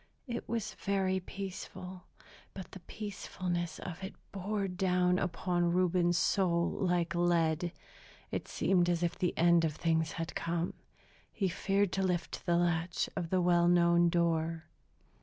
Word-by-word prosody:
It 235 -3 -5
was 215 -3 -2
very 190 -1 +1
peaceful; 185 -1 -7 0.5
but 190 -3 -8
the 190 - -9
peacefulness 175 -4 -4
of 180 0 -7
it 190 - -6 0.2
bore 200 +1 -2
down 180 -1 +2
upon 175 -1 0
Reuben's 175 -1 +2
soul 170 -3 +2
like 175 -3 0
lead. 170 -1 +2 0.6
It - - -3
seemed 175 -2 +2
as 175 0 +1
if 170 - 0
the 180 - -1
end 170 0 +5
of 155 -2 0
things 160 -1 0
had 165 0 -4
come. 170 +1 -2 0.6
He 195 -3 0
feared 195 +2 +1
to 195 - -1
lift 180 -2 -2
the 170 0 +3
latch 175 0 0
of 175 -3 -3
the 185 0 +2
well 175 -1 +4
known 170 0 +5
door. 165 -1 0
175 Hz, 145 wpm, -32 LUFS, 170-190 Hz, 0.6 s, end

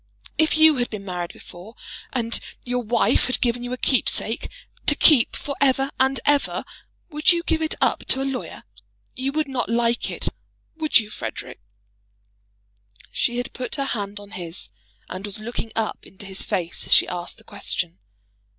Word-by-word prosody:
If 315 0 +3
you 315 -2 +7
had 245 -1 0
been 205 -2 -7
married 175 -2 -4
before, 185 +6 -13 0.4
and 235 -2 0 0.3
your 245 0 -1
wife 235 0 +2
had 255 - +1
given 240 0 +1
you 245 - -5
a 250 - -2
keepsake, 240 -3 +2 0.4
to 295 - +7
keep 285 -6 +6
for 280 - -4
ever 270 0 +3
and 265 0 +3
ever, 290 -1 +2 0.5
would 300 +2 +4
you 340 -1 +1
give 325 -2 0
it 315 - +1
up - - +2
to 265 - +4
a - - -2
lawyer? 270 -2 -4 0.5
You 265 +2 -1
would 310 0 0
not 255 -5 -2
like 235 0 +1
it; - - -1 0.5
would 315 -1 +4
you, 215 -3 -1
Frederic?" 125 - -6 1.5
She 240 - 0
had 245 - -3
put 250 -1 -4
her 275 -2 -1
hand 205 -5 -3
on 205 0 -13
his, 175 -4 -5 0.4
and 185 +1 -6
was 205 -2 -2
looking 225 +1 -5
up 225 -1 -2
into 195 +1 -10
his 190 0 -6
face 170 -2 -3
as - - -6
she - - +6
asked 175 0 -4
the - - -17
question. 85 +3 -3
240 Hz, 180 wpm, -23 LUFS, 205-270 Hz, 1.5 s, you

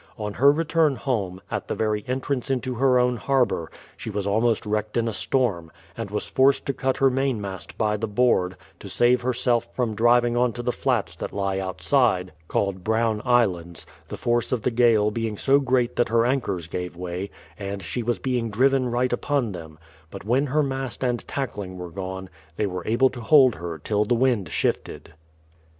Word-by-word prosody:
On 105 -2 -4
her 140 +6 +5
return 160 -1 +2
home, 100 -5 -2
at - - -3
the - - -2
very 105 -1 -1
entrance 130 +1 -2
into 130 -1 -1
her 125 +1 +3
own 125 0 +2
har 130 +3 +2
bour, 85 -7 -4 0.3
she - - -7
was 100 -2 -3
almost 110 +3 +1
wrecked 105 +1 -2
in 115 0 +1
a 115 - -2
storm, 100 -14 0 0.2
and - - -5
was - - -3
forced 135 +1 +3
to 140 - -1
cut 130 0 -1
her 135 -1 +4
main 135 -2 0
mast 95 -5 -7
by 105 -1 +1
the 110 +2 -3
board, 100 -5 +1 0.2
to - - -9
save 125 +1 +3
herself 120 -1 0
from 120 -4 0
driving 120 +2 +3
onto 120 -1 0
the 125 - 0
flats 120 -11 -1
that - - -5
lie 95 -1 -1
outside, 95 0 +1 0.2
called 95 0 -1
Brown 110 0 +1
Islands, 90 -9 +1 0.2
the - - -7
force 120 -1 0
of 125 -4 -1
the 125 - +1
gale 115 -3 +3
being 110 -1 -3
so 140 +5 +3
great 125 -3 +1
that 120 - +2
her 115 +1 +3
anchors 115 - -1
gave 90 +1 -5
way, 90 +2 -5 0.3
and 100 -1 -5
she 125 - -3
was 120 +1 -1
being 125 -3 -1
driven 130 +3 +2
right 125 +1 0
upon 130 -2 0
them; 80 -4 -9 0.3
but 95 +2 -9
when 130 +6 +2
her 150 +3 +2
mast 135 -2 -4
and 120 -2 -1
tackling 105 -9 -4
were 90 -1 -7
gone, 95 +1 -6 0.3
they 105 - 0
weie 90 -3 -5
able 125 +4 +3
to 120 - -8
hold 130 0 +6
her 85 -2 -6
till 105 +7 0
the 120 - +2
wind 120 -5 +1
shifted. - - -2
115 Hz, 195 wpm, -24 LUFS, 100-125 Hz, 0.3 s, hold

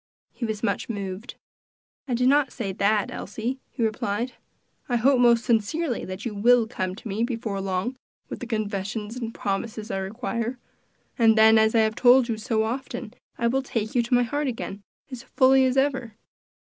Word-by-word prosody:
He 240 - -4
was 220 -1 -4
much 230 - -1
moved. 200 +1 -5 0.7
"I 250 - 0
did 250 +1 +2
not 280 -1 +3
say 210 -6 -4
that, 205 +1 +1
Elsie," 230 +6 -4
he 235 - -3
replied. 220 +2 -1 0.6
"I 245 - +1
hope 255 +3 +4
most 235 -1 +4
sincerely 240 +5 0
that 185 +3 -7
you 235 - -3
will 235 +3 +4
come 185 -5 -4
to 230 - -9
me 210 +2 -1
before 225 -5 -3
long 190 +6 -2 0.3
with - - -7
the 250 - -6
confessions 210 0 -3
and 235 -2 -4
promises 215 +2 -4
I 195 - -1
require; 230 +4 -3 0.6
and 225 -1 +5
then, 220 0 +7
as 220 +1 +3
I 225 - +6
have 220 0 +1
told 245 +1 +5
you 225 - -1
so 220 0 0
often, 245 -1 -4 0.2
I 235 - -1
will 260 +3 +2
take 225 -4 -3
you 245 - +3
to 240 +2 +1
my 245 - +4
heart 285 +4 -2
again, 215 -5 -5 0.3
as 255 -2 -6
fully 265 +1 +4
as 260 +1 +1
ever. 265 -5 0
230 Hz, 185 wpm, -25 LUFS, 210-250 Hz, 0.7 s, then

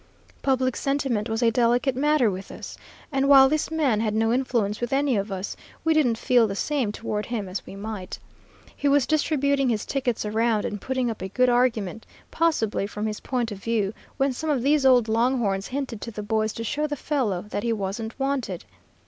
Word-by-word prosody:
Public 260 -2 +1
sentiment 270 -6 -1
was 225 +2 -1
a 230 - +4
delicate 245 +3 +2
matter 285 -4 +3
with 190 +1 -7
us, - - -8 0.4
and 275 0 +1
while 270 -1 +9
this 305 +2 0
man 295 -9 +1
had 215 -1 0
no 225 +1 +2
influence 235 -5 0
with 240 - -2
any 275 -1 +2
of 200 0 -2
us, 190 +1 -4 0.3
we 320 0 +3
didn't 255 -8 +2
feel 240 -1 +3
the 195 - -4
same 265 -1 0
toward 210 -1 -4
him 225 -5 -3
as 185 +1 -5
we - - -9
might. 200 -2 -6 0.6
He 285 - -1
was 280 -2 +4
distributing 280 -3 +1
his 215 -3 -1
tickets 250 -5 -1
around, 220 0 +1
and 210 -2 -4
putting 260 -2 -1
up 220 - -8
a 190 - -4
good 255 +5 +3
argument, 230 -5 0 0.2
possibly, 225 -12 +1
from 210 +1 -4
his 215 -1 -3
point 245 -3 -2
of 200 - -6
view, 215 -2 -1 0.2
when 270 0 +1
some 315 +5 -4
of 270 -5 +1
these 285 0 +4
old 250 -3 +5
long 235 +4 +2
horns 195 -4 -1
hinted 260 -5 -4
to - - -5
the 210 -2 -6
boys 215 +1 0
to 230 - -5
show 295 +6 -1
the 295 - -3
fellow 250 - -1
that 205 - -2
he 235 - -1
wasn't 220 +3 -4
wanted. 270 -10 -2
235 Hz, 210 wpm, -25 LUFS, 215-270 Hz, 0.6 s, while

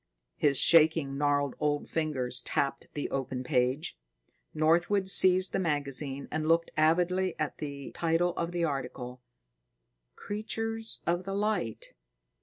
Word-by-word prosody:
His 140 - +1
shaking, 155 -3 +4
gnarled 145 -1 0
old 145 -1 -1
fingers 130 -6 -1
tapped 140 +2 -2
the 145 - -2
open 130 -1 -3
magazine. 125 +4 0 0.7
Northwood 175 +5 +2
seized 185 0 +6
the - - 0
magazine 140 -4 -1
and 155 0 -2
looked 165 +1 +2
avidly 180 +4 +2
at 155 - -3
the 140 -2 -6
title 170 +1 0
of 170 0 -3
the 175 -1 -2
article, 125 -4 -4 0.9
"Creatures 225 +2 -4
of 175 +1 -1
the 195 0 -4
Light." 200 - -2
155 Hz, 125 wpm, -29 LUFS, 140-175 Hz, 0.9 s, seized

